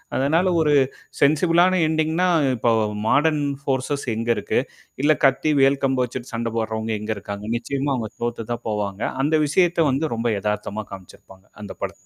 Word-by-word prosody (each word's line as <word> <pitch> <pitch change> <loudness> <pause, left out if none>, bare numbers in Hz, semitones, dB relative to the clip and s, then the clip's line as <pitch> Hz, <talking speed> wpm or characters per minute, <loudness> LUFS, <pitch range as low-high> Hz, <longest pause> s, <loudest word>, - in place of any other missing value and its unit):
அதனால 160 +7 +2
ஒரு 150 -2 +3 0.5
சென்சிபிலான 170 +5 +3
எண்டிங்ன்னா 160 +3 +1 0.3
இப்ப 115 0 +2 0.3
மாடர்ன்ஃபோர்சஸ் 140 -2 0
எங்க 115 +1 -3
இருக்கு? - - 0 0.4
இல்ல 155 +1 +5
கத்தி, 135 +3 +3
வேல் 135 +1 +3
கம்பு 130 -1 +1
வச்சுட்டு 125 +1 -8
சண்ட 115 0 -2
போடுறவங்க 110 0 -2
எங்க 105 +1 -4
இருக்காங்க? 100 +1 -7
நிச்சயமா 140 +3 -2
அவங்க 110 -3 -4
தோத்து 120 -1 -4
தான் 120 - -7
போவாங்க. 105 0 -3 0.2
அந்த 155 +2 +2
விஷயத்த 170 0 +2
வந்து 140 0 -1
ரொம்ப 115 +1 -1
எதார்த்தமா 105 0 -3
காமிச்சிருப்பாங்க. 95 0 -13 0.2
அந்த 100 - -7
பட - - -2
135 Hz, 150 wpm, -22 LUFS, 110-150 Hz, 0.5 s, இல்ல